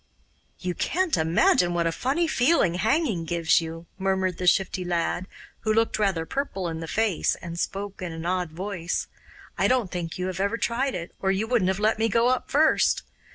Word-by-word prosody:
'You 180 -1 -3
can't 365 - 0
imagine 170 +2 +3
what 170 -1 +1
a 165 - +2
funny 275 - 0
feeling 260 - +3
hanging 220 - +1
gives 165 -1 +2
you,' 165 +1 -7
murmured 190 -2 0
the 180 - -1
Shifty 185 +1 +2
Lad, 175 +1 -1 0.3
who 220 - -1
looked 225 0 +1
rather 190 -6 +1
purple 195 - -3
in 160 -1 -5
the 165 - -6
face 210 0 +1
and 170 0 -7
spoke 200 +1 -4
in 180 -2 -4
an 165 0 -6
odd 180 -1 0
voice. 175 +1 -3 0.5
'I - - +4
don't 250 -7 +1
think 170 -1 -4
you 180 - -2
have 185 -1 -4
every 200 +4 0
tried 250 +3 -1
it, 170 -1 -5
or 190 - 0
you 195 +3 0
wouldn't 225 -5 +1
have 190 - 0
let 215 +1 +1
me 225 +1 +2
go 230 +3 +3
up 255 - -1
first. 310 +3 +3
190 Hz, 200 wpm, -25 LUFS, 170-225 Hz, 0.5 s, I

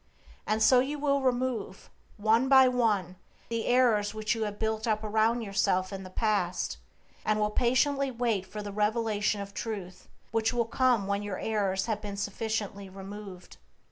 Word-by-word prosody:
And 215 +1 +1
so 255 +2 +6
you 280 +4 -1
will 280 -1 +1
remove, 250 -6 -2 0.3
one 225 +5 +3
by 265 -1 +8
one, 210 -8 +1 0.3
the 230 -1 -2
errors 230 -5 +3
which 215 0 0
you 225 -2 -2
have 205 -1 -5
built 220 +1 -1
around 220 +2 +1
yourself 195 -2 0
in 195 - -5
the 185 - -9
past, 195 -3 -1 0.5
and 215 0 +1
will 210 0 +1
patiently 275 +4 +2
wait 230 -6 -1
for 210 +2 -6
the 205 - -6
revelation 210 0 0
of 200 0 -8
Truth 190 -6 -6 0.2
which 225 +1 +1
will 235 -1 +1
come 240 -2 +2
when 200 +1 -1
your 205 -2 -4
errors 195 -3 0
have 215 -2 -2
been 205 -1 -6
sufficiently 205 -1 -3
removed. 195 -1 -10
215 Hz, 165 wpm, -29 LUFS, 200-235 Hz, 0.5 s, by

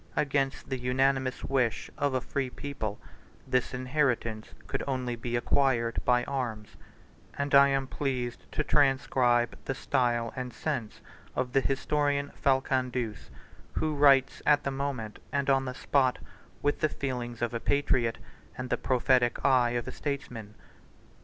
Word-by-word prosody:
Against 140 -2 0
the 130 -1 -2
unanimous 130 +1 +1
wish 130 -4 0
of 145 -2 0
a 130 - +1
free 135 +1 -2
people, 110 -6 -5 0.5
this 125 -1 0
inheritance 125 -4 -1
could - - -3
only 130 -3 -1
be 120 +1 -4
acquired 120 -2 +1
by 125 -1 +3
arms; 115 -7 -4 0.6
and 140 0 -2
I 140 0 +8
am 135 -1 +1
pleased 130 -3 -3
to 155 - 0
transcribe 130 -4 +2
the 135 - -2
style 120 -4 0
and 125 -1 -4
sense 120 -6 -4 0.3
of 125 -1 -2
the 135 - +4
historian 145 +1 0
Falcandus, 130 -4 0 0.4
who 155 -1 0
writes 140 -2 +4
at 145 -1 +4
the 140 - -1
moment, 135 -6 -4
and 140 -1 +1
on 135 0 +2
the 125 -1 -4
spot, 130 -2 +2 0.5
with 145 0 +1
the 155 - +2
feelings 120 -5 -4
of 120 - -1
a 115 - -1
patriot, 120 -4 +1 0.4
and 125 -1 -5
the - - +2
prophetic 125 -1 +2
eye 125 -3 +4
of 120 - -4
a - - -3
statesman. 125 -7 -5
130 Hz, 145 wpm, -29 LUFS, 120-140 Hz, 0.6 s, I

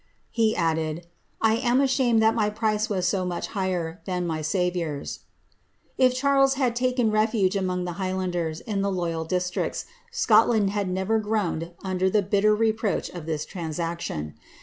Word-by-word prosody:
'' - - -42
He 225 -2 +2
added, 160 -2 0
^ - - -8 0.4
I 220 0 +4
am 245 +1 +2
ashamed 255 -4 +3
that 220 0 +5
my 215 -2 +1
price 215 0 0
was 185 -3 0
so 190 -2 0
much 180 -1 -3
higher 185 -3 -2
than 180 -2 -2
my 160 -2 -2
Saviour's." 170 -3 -2 0.8
If 255 -1 +3
Charles 275 0 +3
bad 255 -4 0
taken 250 -2 +1
refuge 215 -2 +2
among 180 -2 -1
the 175 - -3
higfiianders, 180 -4 -2
in 205 -3 -2
the 200 0 0
loyal 170 -3 -2
districts, 180 +1 -2 0.3
Scotland 220 - +4
had 205 -2 -1
never 190 +4 0
groaned 200 -6 -2
under 190 0 0
the 205 +1 +2
bitter 205 +2 +3
reproach 220 -1 0
of 170 -3 -8
this 155 -2 -2
transaction. 165 - -4
195 Hz, 165 wpm, -25 LUFS, 175-220 Hz, 0.8 s, that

